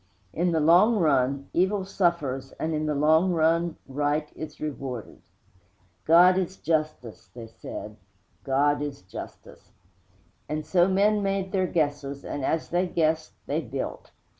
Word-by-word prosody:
In 175 Hz, +1 st, +1 dB
the 165 Hz, -, +1 dB
long 180 Hz, +9 st, +5 dB
run, 140 Hz, -5 st, +1 dB
evil 190 Hz, +2 st, +1 dB
suffers, 170 Hz, -9 st, -1 dB
and, 160 Hz, 0 st, -3 dB
in 155 Hz, 0 st, -1 dB
the 150 Hz, -, 0 dB
long 160 Hz, +5 st, +3 dB
run, 165 Hz, +1 st, +2 dB
right 145 Hz, +2 st, -1 dB
is 155 Hz, -, -8 dB
rewarded. 135 Hz, -6 st, -6 dB, 0.8 s
'God 180 Hz, +3 st, +6 dB
is 190 Hz, +1 st, -3 dB
Justice,' 155 Hz, -7 st, -3 dB
they 120 Hz, -2 st, -8 dB
said, 110 Hz, -1 st, -9 dB, 0.5 s
'God 145 Hz, +4 st, +2 dB
is 145 Hz, -7 st, -5 dB
Justice!' 95 Hz, -, -11 dB, 0.8 s
And 155 Hz, 0 st, -3 dB
so 175 Hz, +1 st, +3 dB
men 205 Hz, +2 st, +3 dB
made 195 Hz, -1 st, -1 dB
their 190 Hz, -2 st, +1 dB
guesses, 145 Hz, -4 st, -2 dB
and, 145 Hz, -, -4 dB
as 160 Hz, +4 st, -1 dB
they 180 Hz, +2 st, +1 dB
guessed, 160 Hz, -2 st, 0 dB
they -, -, -1 dB
built. -, -, -6 dB
155 Hz, 140 wpm, -26 LUFS, 145-180 Hz, 0.8 s, God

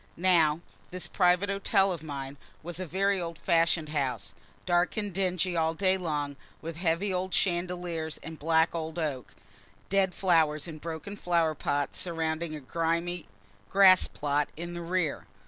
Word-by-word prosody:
Now, 165 Hz, -3 st, +3 dB, 0.3 s
this 180 Hz, -1 st, -4 dB
private 180 Hz, +2 st, +3 dB
hotel 195 Hz, 0 st, +2 dB
of 170 Hz, -, -7 dB
mine 140 Hz, -2 st, -6 dB, 0.3 s
was 175 Hz, +1 st, -5 dB
a 185 Hz, -, -4 dB
very 195 Hz, +3 st, +1 dB
old 165 Hz, -1 st, -5 dB
fashioned 165 Hz, -1 st, +2 dB
house, 130 Hz, -8 st, -2 dB, 0.3 s
dark 175 Hz, +2 st, +2 dB
and 205 Hz, -3 st, -2 dB
dingy 185 Hz, -1 st, 0 dB
all 160 Hz, 0 st, +1 dB
day 190 Hz, +1 st, +2 dB
long, 150 Hz, -6 st, -2 dB, 0.2 s
with 165 Hz, 0 st, -6 dB
heavy 175 Hz, +3 st, 0 dB
old 185 Hz, 0 st, -1 dB
chandeliers 175 Hz, -3 st, -1 dB
and 160 Hz, -1 st, -8 dB
black 160 Hz, +2 st, +3 dB
old 160 Hz, 0 st, -4 dB
oak, 145 Hz, -6 st, -2 dB
and 100 Hz, 0 st, -28 dB
dead 190 Hz, -2 st, +2 dB
flowers 160 Hz, -5 st, +2 dB
in 155 Hz, -2 st, -8 dB
broken 165 Hz, +6 st, -6 dB
flower 170 Hz, -4 st, +1 dB
pots 145 Hz, -1 st, -2 dB
surrounding 165 Hz, -2 st, -2 dB
a -, -, -6 dB
grimy 170 Hz, +4 st, -2 dB, 0.4 s
grass 190 Hz, -1 st, +7 dB
plot 145 Hz, 0 st, -1 dB
in 175 Hz, +1 st, -5 dB
the 175 Hz, -, -5 dB
rear. 170 Hz, -3 st, -1 dB
170 Hz, 160 wpm, -29 LUFS, 155-180 Hz, 0.4 s, grass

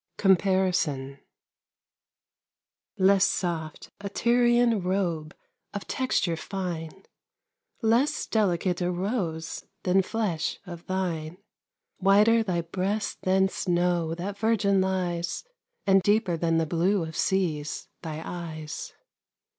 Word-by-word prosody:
COMPARISON 180 Hz, -8 st, +2 dB, 1.8 s
Less 190 Hz, 0 st, +5 dB
soft 165 Hz, -6 st, -2 dB
a 200 Hz, 0 st, -5 dB
Tyrian 240 Hz, 0 st, +3 dB
robe 175 Hz, -4 st, -1 dB, 0.4 s
Of 205 Hz, -, -5 dB
texture 255 Hz, -9 st, 0 dB
fine, 180 Hz, 0 st, -5 dB, 0.8 s
Less 235 Hz, +6 st, +2 dB
delicate 185 Hz, -4 st, +1 dB
a 175 Hz, -, +1 dB
rose 175 Hz, -4 st, -2 dB, 0.2 s
Than 190 Hz, +1 st, +4 dB
flesh 190 Hz, -5 st, -2 dB
of 175 Hz, -2 st, -9 dB
thine. 175 Hz, -3 st, -2 dB, 0.6 s
Whiter 210 Hz, +4 st, +5 dB
thy 180 Hz, -6 st, 0 dB
breast 190 Hz, +5 st, -2 dB
than 190 Hz, +1 st, +3 dB
snow 175 Hz, -3 st, 0 dB
That 195 Hz, +4 st, -5 dB
virgin 210 Hz, -3 st, +3 dB
lies, 180 Hz, -2 st, -1 dB, 0.4 s
And 195 Hz, -1 st, +5 dB
deeper 205 Hz, -2 st, +2 dB
than 165 Hz, 0 st, +1 dB
the 165 Hz, -, +2 dB
blue 175 Hz, +4 st, +1 dB
Of 160 Hz, 0 st, -7 dB
seas 165 Hz, -7 st, -1 dB
thy 160 Hz, -1 st, -5 dB
eyes. 160 Hz, -3 st, -6 dB
185 Hz, 105 wpm, -27 LUFS, 165-200 Hz, 1.8 s, Less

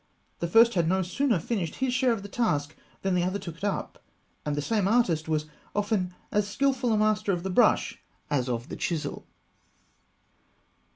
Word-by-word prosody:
The 170 Hz, -, -1 dB
first 230 Hz, +6 st, +6 dB
had 170 Hz, -4 st, +2 dB
no 190 Hz, +1 st, +2 dB
sooner 225 Hz, +6 st, +1 dB
finished 170 Hz, -1 st, -2 dB
his 260 Hz, -1 st, 0 dB
share 255 Hz, 0 st, +3 dB
of 220 Hz, -4 st, -2 dB
the -, -, -6 dB
task 155 Hz, -, -1 dB, 0.3 s
than 190 Hz, -1 st, +1 dB
the 180 Hz, -, +2 dB
other 185 Hz, +3 st, 0 dB
took 170 Hz, -5 st, -8 dB
it 190 Hz, -, -16 dB
up; 205 Hz, -1 st, -3 dB, 0.4 s
and 150 Hz, -1 st, -1 dB
the 145 Hz, -, -1 dB
same 210 Hz, -1 st, +1 dB
artist 180 Hz, -9 st, +2 dB
was 155 Hz, -1 st, 0 dB, 0.3 s
often 200 Hz, -3 st, 0 dB, 0.2 s
as 205 Hz, -1 st, +1 dB
skilful 260 Hz, +2 st, +1 dB
a 215 Hz, -, +3 dB
master 215 Hz, -1 st, +2 dB
of 175 Hz, -1 st, -2 dB
the 190 Hz, -, -2 dB
brush 245 Hz, -, +3 dB, 0.3 s
as 130 Hz, -3 st, 0 dB
of 120 Hz, 0 st, -3 dB
the -, -, -5 dB
chisel. 155 Hz, -4 st, -3 dB
195 Hz, 185 wpm, -27 LUFS, 165-225 Hz, 0.4 s, first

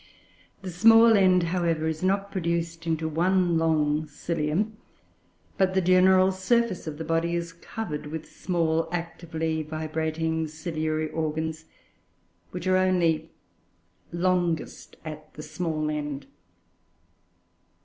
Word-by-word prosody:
The 185 Hz, -, -5 dB
small 225 Hz, +5 st, +7 dB
end, 185 Hz, -3 st, +4 dB
however, 170 Hz, -2 st, 0 dB
is 160 Hz, -1 st, -3 dB
not 195 Hz, +2 st, 0 dB
produced 170 Hz, -2 st, -2 dB
into 160 Hz, -1 st, 0 dB
one 175 Hz, +1 st, +2 dB
long 155 Hz, -1 st, +1 dB
cilium, 165 Hz, +8 st, -2 dB, 0.8 s
but 190 Hz, -1 st, +2 dB
the -, -, +5 dB
general 185 Hz, +1 st, +5 dB
surface 190 Hz, 0 st, 0 dB
of 150 Hz, -1 st, -5 dB
the 160 Hz, -, -4 dB
body 165 Hz, +1 st, 0 dB
is 170 Hz, -1 st, -3 dB
covered 170 Hz, -4 st, -6 dB
with 160 Hz, +1 st, -6 dB
small 165 Hz, -2 st, -1 dB
actively 165 Hz, -2 st, -3 dB
vibrating 160 Hz, +1 st, -2 dB
ciliary 155 Hz, 0 st, -3 dB
organs, 160 Hz, 0 st, -3 dB, 0.8 s
which 180 Hz, -1 st, -6 dB
are 185 Hz, 0 st, +3 dB
only 180 Hz, -4 st, +2 dB, 0.8 s
longest 175 Hz, -2 st, -1 dB
at 155 Hz, -1 st, -8 dB
the 155 Hz, -, -8 dB
small 155 Hz, 0 st, -2 dB
end. 145 Hz, -2 st, -4 dB
165 Hz, 115 wpm, -26 LUFS, 155-185 Hz, 0.8 s, small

